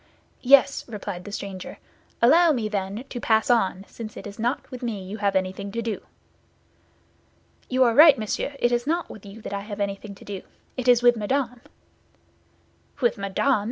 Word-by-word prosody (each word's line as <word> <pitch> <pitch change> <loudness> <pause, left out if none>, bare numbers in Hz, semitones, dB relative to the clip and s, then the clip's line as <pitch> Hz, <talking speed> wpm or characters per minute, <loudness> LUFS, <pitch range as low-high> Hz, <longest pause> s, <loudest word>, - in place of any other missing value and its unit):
"Yes," 275 +1 +5
replied 200 -5 -6
the 205 - -7
stranger. 195 -2 -6 0.5
"Allow 325 +6 +6
me, 230 -5 -1
then, 200 +2 -3
to 245 - -5
pass 220 +1 +2
on, 195 -4 +1
since 215 -2 -9
it - - -8
is 205 +1 -9
not 240 +5 -2
with 255 - -7
me 225 -6 -3
you 195 +3 -7
have 200 -2 0
anything 190 +1 -2
to 230 - -2
do." 220 -3 -3 1.7
"You 255 0 +3
are 235 -2 +3
right, 300 +2 +8
monsieur, 220 +6 -3
it 240 -2 +1
is 240 +2 0
not 335 +2 -1
with 205 -1 -11
you 205 +3 -11
that - - -6
I 200 - -2
have 205 0 -7
anything 200 0 -4
to - - -15
do; 200 -2 -6 0.3
it 255 -1 -4
is 245 -1 +5
with 240 0 +6
Madame." 245 +2 -1 1.4
"With 240 -4 +1
Madame! 200 +5 +1
220 Hz, 185 wpm, -24 LUFS, 200-245 Hz, 1.7 s, right